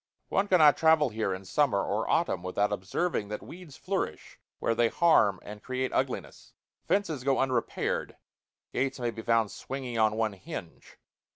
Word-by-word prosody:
One 200 +1 +1
cannot 155 -7 +6
travel 160 -3 +4
here 110 -2 -2
in 95 +1 -5
summer 115 -5 +2
or - - -2
autumn - - +1
without 100 +3 0
observing 105 - -2
that 105 +1 -6
weeds 170 -5 -11
flourish 185 - -4 0.2
where - - 0
they 120 +1 +3
harm 115 - +3
and 105 0 -9
create 130 0 -3
ugliness; 130 -1 -3 0.3
fences 165 -10 0
go 135 0 +2
unrepaired; 130 -3 -1 0.6
gates 130 +1 -1
may 120 -1 -1
be 115 - -7
found 115 -3 +2
swinging 125 +3 -5
on 110 -1 +3
one 110 -2 0
hinge. 90 -3 -9
120 Hz, 160 wpm, -29 LUFS, 105-145 Hz, 0.6 s, cannot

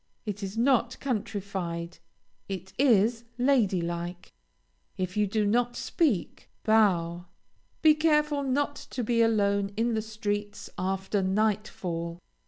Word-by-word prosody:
It 210 -1 -4
is 195 +2 -5
not 245 0 +2
countrified, 190 -8 -3 0.5
it 190 -1 -6
is 230 -3 +4
lady 245 -8 +3
like. 175 +1 -5 0.6
If 185 0 -3
you 210 -1 +2
do 210 +1 0
not 240 +3 +1
speak, 265 - -1
bow. 180 -6 +2 0.6
Be 310 -1 +8
careful 300 -2 +2
not 280 +2 0 0.2
to 250 - -3
be 230 +1 +2
alone 200 -3 +2
in 230 +1 +1
the 220 - 0
streets 205 -1 -4
after 190 +2 -1
night 210 +2 +1
fall. 170 -1 -4
210 Hz, 125 wpm, -28 LUFS, 190-240 Hz, 0.6 s, Be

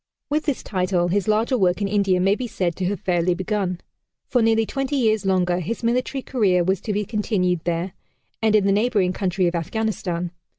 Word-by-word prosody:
With 305 +1 0
this 290 -5 -1
title 180 -3 0
his 200 +2 0
larger 225 +4 +2
work 180 -1 +2
in 200 - 0
India 195 -2 +2
may 195 +2 +3
be 245 +3 -3
said 175 -6 -2
to 185 - -2
have 195 0 -1
fairly 175 -1 +1
begun. 185 -1 -2 0.5
For 245 - +1
nearly 225 0 +3
twenty 270 +4 -2
years 220 -6 +1
longer 180 -2 +2
his 220 +8 -4
military 255 +3 0
career 195 -8 +2
was 190 +1 0
to 215 - -3
be 210 0 -1
continued 195 -5 0
there, 175 +2 -2 0.5
and 220 -1 +3
in 205 -2 +4
the 200 - +3
neighboring 205 -3 +2
country 185 -1 0
of 170 - +1
Afghanistan. 180 -1 -2
195 Hz, 200 wpm, -22 LUFS, 180-220 Hz, 0.5 s, in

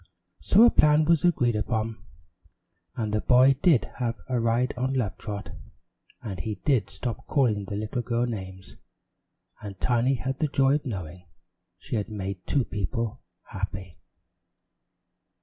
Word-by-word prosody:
So 210 +4 +5
a 240 - +7
plan 150 +1 +4
was 165 -1 +3
agreed 125 -10 +2
upon, 110 +1 -2 0.9
and 110 -3 -2
the 105 - +1
boy 130 +2 +5
did 160 -10 +4
have 120 -2 -1
a 125 -2 0
ride 115 +2 +1
on 130 +2 -1
Love 115 -7 -1
Trot, 105 -1 -6 0.7
and 100 -6 -5
he 105 +5 -3
did 120 -10 +2
stop 120 +1 -6
calling 110 -8 +1
the 100 - -5
little 110 +4 -2
girl 120 0 0
names, 95 -5 -7 0.8
and 100 -2 -8
Tiny 125 +2 +2
had 130 +2 -4
the 155 - +2
joy 135 -1 +3
of 145 -2 -1
knowing 90 -5 -6 0.5
she 115 - -4
had 105 +1 -3
made 100 -3 -5
two 135 -4 +1
people 115 +4 -3 0.3
happy. 95 -2 -6
115 Hz, 150 wpm, -26 LUFS, 100-130 Hz, 0.9 s, a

